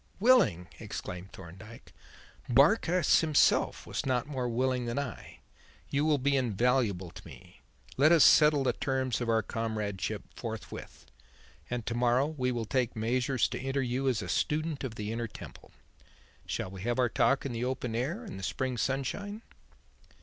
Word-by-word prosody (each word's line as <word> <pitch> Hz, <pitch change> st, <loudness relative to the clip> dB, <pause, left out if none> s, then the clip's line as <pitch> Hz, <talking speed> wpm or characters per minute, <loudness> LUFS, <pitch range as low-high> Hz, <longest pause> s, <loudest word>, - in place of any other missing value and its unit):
"Willing!" 205 Hz, -, +4 dB
exclaimed 90 Hz, +2 st, -7 dB
Thorndyke, 95 Hz, +6 st, -12 dB, 0.6 s
"Barkis 170 Hz, -, +4 dB
himself 155 Hz, -3 st, +2 dB
was -, -, -3 dB
not 125 Hz, -3 st, 0 dB
more 130 Hz, -4 st, -3 dB
willing 125 Hz, +1 st, 0 dB
than 120 Hz, +2 st, -3 dB
I. 140 Hz, -6 st, -6 dB, 0.5 s
You 145 Hz, +1 st, +1 dB
will 155 Hz, -2 st, +3 dB
be 140 Hz, +1 st, +1 dB
invaluable 115 Hz, -6 st, +1 dB
to -, -, -12 dB
me. -, -, -15 dB, 0.4 s
Let 150 Hz, +4 st, +5 dB
us 165 Hz, -3 st, +7 dB
settle 150 Hz, -2 st, +6 dB
the 125 Hz, -2 st, +1 dB
terms 130 Hz, -2 st, -1 dB
of 120 Hz, -, -2 dB
our 110 Hz, -1 st, +2 dB
comradeship 110 Hz, -4 st, -3 dB
forthwith, 70 Hz, 0 st, -8 dB, 0.6 s
and 120 Hz, -2 st, -3 dB
to 120 Hz, -, -2 dB
morrow 120 Hz, +2 st, +2 dB
we 135 Hz, -5 st, -2 dB
will 120 Hz, -2 st, -2 dB
take 125 Hz, +1 st, -1 dB
measures 125 Hz, +2 st, +1 dB
to -, -, -4 dB
enter 135 Hz, +1 st, -1 dB
you 130 Hz, +2 st, -1 dB
as 115 Hz, -5 st, +1 dB
a -, -, -6 dB
student 155 Hz, -1 st, -1 dB
of 125 Hz, -4 st, -4 dB
the 105 Hz, 0 st, -4 dB
Inner 115 Hz, +1 st, -3 dB
Temple. -, -, -12 dB, 0.8 s
Shall 95 Hz, -, -3 dB
we 95 Hz, -1 st, -9 dB
have 120 Hz, +3 st, -1 dB
our 125 Hz, -1 st, +3 dB
talk 135 Hz, +4 st, +1 dB
in 135 Hz, -, -2 dB
the 120 Hz, +1 st, -2 dB
open 125 Hz, -2 st, -3 dB
air 150 Hz, -, -2 dB
and 200 Hz, -, -8 dB
the -, -, -9 dB
spring 130 Hz, +5 st, -2 dB
sunshine?" 200 Hz, -, -3 dB
125 Hz, 165 wpm, -30 LUFS, 115-140 Hz, 0.8 s, us